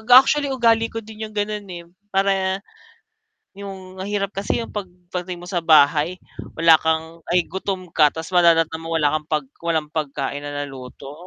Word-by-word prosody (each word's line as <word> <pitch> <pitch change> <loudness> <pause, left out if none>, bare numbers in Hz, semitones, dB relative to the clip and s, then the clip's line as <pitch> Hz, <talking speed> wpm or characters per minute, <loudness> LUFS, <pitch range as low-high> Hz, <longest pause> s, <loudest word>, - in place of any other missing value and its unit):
actually 285 +2 +6
ugali 230 -3 +3
ko 225 -1 -6
din 220 0 -7
yung 215 - -16
ganun 205 -1 -2
eh, 175 -2 -8 0.3
para, 195 0 +1 0.9
yung 190 -1 -9
mahirap 200 0 -2
kasi 200 +4 -1
yung - - -9
pag 205 -3 -4 0.3
dating 180 0 -6
mo - - -8
sa 175 -2 0
bahay 155 +1 +4 0.4
wala 165 -1 +6
kang 160 +1 -1
ay 175 0 +3
gutom 185 -1 -5
ka 150 -2 +5
tas 160 +4 -8
madadatnan 165 -2 +4
mo 165 0 -3
wala 150 -2 +2
kang 155 -1 -2
pag 150 -2 0 0.2
walang 160 -3 -1
pagkain 140 -2 -3
na 145 0 -4
naluto, 135 0 -10
175 Hz, 170 wpm, -22 LUFS, 160-200 Hz, 0.9 s, actually